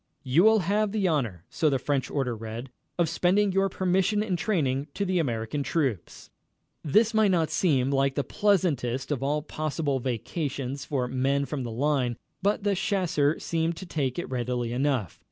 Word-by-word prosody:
"You 140 Hz, +6 st, +3 dB
will 220 Hz, 0 st, +6 dB
have 205 Hz, +3 st, +1 dB
the 205 Hz, -3 st, +1 dB
honor," 115 Hz, -, -1 dB
so 155 Hz, -, +2 dB
the 135 Hz, -, +2 dB
French 135 Hz, +1 st, -1 dB
order 130 Hz, -4 st, -1 dB
read, 115 Hz, +3 st, -7 dB, 0.3 s
"of 170 Hz, -2 st, +2 dB
spending 190 Hz, +5 st, +2 dB
your 195 Hz, +1 st, +2 dB
permission 190 Hz, +3 st, +1 dB
in 200 Hz, -4 st, -1 dB
training 150 Hz, -, 0 dB
the 185 Hz, -2 st, 0 dB
American 120 Hz, -1 st, -1 dB
troops." 135 Hz, -, -2 dB, 0.5 s
This 215 Hz, +10 st, +3 dB
might 215 Hz, -2 st, +4 dB
not 165 Hz, -4 st, +1 dB
seem 135 Hz, -7 st, +2 dB
like 135 Hz, 0 st, +1 dB
the 145 Hz, -, 0 dB
pleasantest 145 Hz, -, 0 dB
of 135 Hz, -4 st, -1 dB
all 145 Hz, +2 st, 0 dB
possible 155 Hz, -2 st, -2 dB
vacations 135 Hz, +2 st, -3 dB
for 130 Hz, -5 st, -1 dB
men 135 Hz, +2 st, 0 dB
from 135 Hz, +1 st, -4 dB
the 120 Hz, -, -4 dB
line, 125 Hz, -1 st, 0 dB, 0.2 s
but 200 Hz, +2 st, +1 dB
the 205 Hz, -1 st, +2 dB
chasseurs 180 Hz, -6 st, 0 dB
seemed 165 Hz, 0 st, 0 dB
to 190 Hz, -, -7 dB
take 140 Hz, -7 st, -2 dB
to 175 Hz, -, -2 dB
it -, -, -10 dB
readily 120 Hz, -1 st, -2 dB
enough. 130 Hz, -, -1 dB
145 Hz, 175 wpm, -27 LUFS, 130-180 Hz, 0.5 s, will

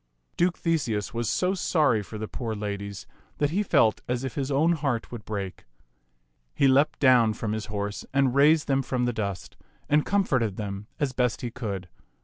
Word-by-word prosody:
Duke 175 Hz, +1 st, +1 dB
Theseus 120 Hz, -, -1 dB
was 115 Hz, -1 st, -1 dB
so 185 Hz, +1 st, +1 dB
sorry 150 Hz, -, +2 dB
for 110 Hz, +2 st, -8 dB
the 110 Hz, 0 st, -4 dB
poor 115 Hz, -2 st, -4 dB
ladies 100 Hz, -1 st, -5 dB, 0.3 s
that 145 Hz, 0 st, +1 dB
he 195 Hz, +5 st, +1 dB
felt 110 Hz, -, +3 dB
as 125 Hz, +1 st, -1 dB
if 130 Hz, -, -4 dB
his 135 Hz, -2 st, -2 dB
own 150 Hz, +5 st, +3 dB
heart 140 Hz, -8 st, -1 dB
would 120 Hz, -3 st, -7 dB
break. 100 Hz, -3 st, -5 dB, 0.9 s
He 140 Hz, -, +4 dB
leaped 140 Hz, +3 st, +3 dB
down 125 Hz, -5 st, +5 dB
from 105 Hz, 0 st, -3 dB
his 110 Hz, 0 st, -3 dB
horse 100 Hz, -1 st, -4 dB
and 135 Hz, -2 st, +2 dB
raised 150 Hz, +3 st, +4 dB
them 135 Hz, -1 st, +2 dB
from 125 Hz, -1 st, -1 dB
the 120 Hz, -, 0 dB
dust, 100 Hz, -4 st, -4 dB, 0.3 s
and 150 Hz, +1 st, +3 dB
com 200 Hz, 0 st, +2 dB
forted 115 Hz, -, 0 dB
them 100 Hz, -1 st, -5 dB
as 140 Hz, -3 st, 0 dB
best 125 Hz, -3 st, 0 dB
he 120 Hz, -, -4 dB
could. 100 Hz, -7 st, -5 dB
125 Hz, 190 wpm, -26 LUFS, 105-140 Hz, 0.9 s, down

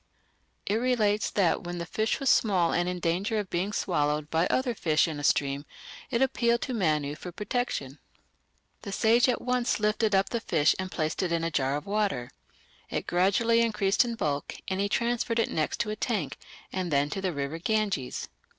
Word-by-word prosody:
It 210 Hz, -, +1 dB
relates 220 Hz, -4 st, +1 dB
that 190 Hz, -5 st, +1 dB
when 175 Hz, 0 st, -5 dB
the 170 Hz, -, -4 dB
fish 220 Hz, +5 st, -1 dB
was 275 Hz, -, -3 dB
small 185 Hz, -6 st, +3 dB
and 175 Hz, +1 st, +1 dB
in 180 Hz, 0 st, -3 dB
danger 185 Hz, +6 st, 0 dB
of 205 Hz, -3 st, -3 dB
being 185 Hz, +4 st, -1 dB
swallowed 150 Hz, -6 st, 0 dB
by 165 Hz, +2 st, +2 dB
other 255 Hz, -2 st, +1 dB
fish 160 Hz, -8 st, +2 dB
in 155 Hz, -3 st, -4 dB
a -, -, -6 dB
stream 140 Hz, -1 st, +1 dB, 0.5 s
it 235 Hz, +3 st, +2 dB
appealed 235 Hz, -3 st, +1 dB
to 260 Hz, -, -3 dB
Manu 155 Hz, -9 st, +1 dB
for 180 Hz, +4 st, -8 dB
protection. 190 Hz, -, -3 dB, 0.8 s
The 200 Hz, -, -6 dB
sage 230 Hz, +5 st, +4 dB
at 250 Hz, -, -1 dB
once 250 Hz, -2 st, 0 dB
lifted 210 Hz, 0 st, +2 dB
up 195 Hz, 0 st, +2 dB
the 235 Hz, -, -2 dB
fish 160 Hz, -8 st, +2 dB
and 185 Hz, 0 st, -3 dB
placed 155 Hz, -3 st, -2 dB
it 180 Hz, -2 st, -1 dB
in 165 Hz, -1 st, 0 dB
a 165 Hz, -, -1 dB
jar 135 Hz, -1 st, +1 dB
of 150 Hz, -, -7 dB
water. 200 Hz, -, -1 dB, 0.6 s
It -, -, -3 dB
gradually 200 Hz, +6 st, +3 dB
increased 210 Hz, -1 st, +2 dB
in 235 Hz, -1 st, -3 dB
bulk, 145 Hz, -9 st, -2 dB
and 190 Hz, 0 st, -2 dB
he 200 Hz, 0 st, +1 dB
transferred 235 Hz, +1 st, 0 dB
it 230 Hz, -, +1 dB
next 155 Hz, -1 st, -1 dB
to 210 Hz, -, -2 dB
a -, -, -2 dB
tank 215 Hz, -1 st, -2 dB, 0.3 s
and 185 Hz, -2 st, -2 dB
then 145 Hz, 0 st, +1 dB
to 195 Hz, -, -3 dB
the 190 Hz, -1 st, 0 dB
river 145 Hz, +1 st, -4 dB
Ganges. 200 Hz, -, -1 dB
195 Hz, 195 wpm, -28 LUFS, 160-225 Hz, 0.8 s, sage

